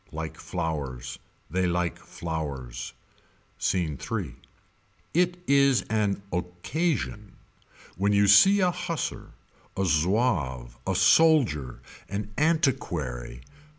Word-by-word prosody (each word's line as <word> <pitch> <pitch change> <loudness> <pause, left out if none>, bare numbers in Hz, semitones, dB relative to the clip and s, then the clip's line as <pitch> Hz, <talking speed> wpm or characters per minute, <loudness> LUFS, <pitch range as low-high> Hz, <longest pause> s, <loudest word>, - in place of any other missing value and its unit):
Like 80 0 -5
flowers. 70 -8 -4 0.3
They 90 +1 +1
like 85 -1 -1
flowers. 70 -7 -5 0.7
Scene 80 -7 0
III. 100 - -3 0.8
It 180 +1 +2
is 140 -3 +4
an 105 -2 0
occasion. 105 - -2 0.6
When 100 +2 +2
you 100 0 +4
see 195 - +7
a 180 -1 +3
Hussar. 170 -2 -4 0.4
A 95 - +1
Zouave. 75 - +1
A - - +1
soldier 110 - +3 0.3
An 105 +1 -4
antiquary. 85 - 0
90 Hz, 95 wpm, -27 LUFS, 75-125 Hz, 0.8 s, see